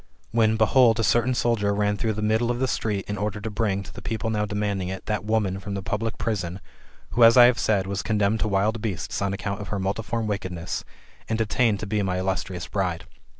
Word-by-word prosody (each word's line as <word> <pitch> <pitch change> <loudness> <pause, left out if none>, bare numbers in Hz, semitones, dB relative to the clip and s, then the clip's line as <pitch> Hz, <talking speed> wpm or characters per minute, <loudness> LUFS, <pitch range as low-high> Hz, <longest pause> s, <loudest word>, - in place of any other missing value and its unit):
When, 110 -1 +3
behold, 115 +1 +4
a - - +2
certain 120 +3 +2
soldier 105 -4 +1
ran 105 0 +1
through 110 +1 -1
the 105 0 -4
middle 110 +2 +2
of 120 - 0
the 130 +1 0
street, 105 -5 -2
in 105 -1 -3
order 105 0 -2
to 105 +2 -5
bring, 105 -2 -1
to - - -12
the - - -9
people 115 0 -2
now 105 -1 0
demanding 100 -2 -2
it, 95 0 -6
that 105 -2 -2
woman 105 -3 0
from 100 0 -5
the 100 - -4
public 105 +3 -2
prison, 95 -5 -2 0.5
who, 120 - +3
as 115 +2 +8
I 120 - +10
have 125 0 +3
said, 100 -3 +1
was 100 +1 -2
condemned 105 0 +1
to 110 - 0
wild 105 +2 +1
beasts, 100 -4 -3
on 100 -1 0
account 100 +1 -3
of 105 - -6
her 105 - -3
multiform 110 +4 -2
wickedness, 95 -4 -3 0.5
and 110 - 0
destined 110 -1 +1
to - - -3
be 105 0 0
my 95 -2 -1
illustrious 95 -1 -2
bride. 90 -3 -2
105 Hz, 230 wpm, -25 LUFS, 100-110 Hz, 0.5 s, I